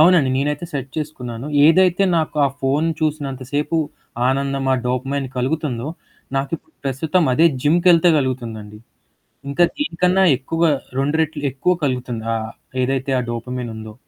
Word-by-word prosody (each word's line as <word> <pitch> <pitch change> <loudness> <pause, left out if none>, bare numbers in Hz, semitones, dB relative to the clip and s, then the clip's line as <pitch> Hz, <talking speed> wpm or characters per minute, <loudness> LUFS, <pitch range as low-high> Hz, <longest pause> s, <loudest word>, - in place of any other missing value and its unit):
అవునండి. 160 -4 +6
నేనైతే 145 +4 -1
సెట్ 135 -2 -4
చేసుకున్నాను. 130 -5 -5 0.2
ఏదైతే 185 +3 +4
నాకు 155 -2 -1
ఆ - - 0
ఫోను 145 +5 +1
చూసినంతసేపు 145 0 -2 0.5
ఆనందం, 135 0 0
ఆ - - +4
డోపమైన్ 135 +2 -1
కలుగుతుందో, 130 -1 -1 0.5
నాకు 135 0 -1
ఇప్పుడు - - -28
ప్రస్తుతం 150 +6 +1
అదే 160 +6 +5 0.2
జిమ్‌కెళ్తే 170 +2 +5
కలుగుతుందండి. 115 -6 -4 0.7
ఇంకా 155 +5 +3
దీనికన్నా 185 - +2
ఎక్కువ, 165 +5 -4 0.4
2 145 +3 +1
రెట్లు 155 -2 -3
ఎక్కువ 180 +7 +1
కలుగుతుంది. 125 -4 -2
ఆ - - 0 0.5
ఏదైతే 135 +1 -1
ఆ - - 0
డోపమైన్ 120 0 -4
ఉందో. 110 0 -8
140 Hz, 130 wpm, -20 LUFS, 130-160 Hz, 0.7 s, అవునండి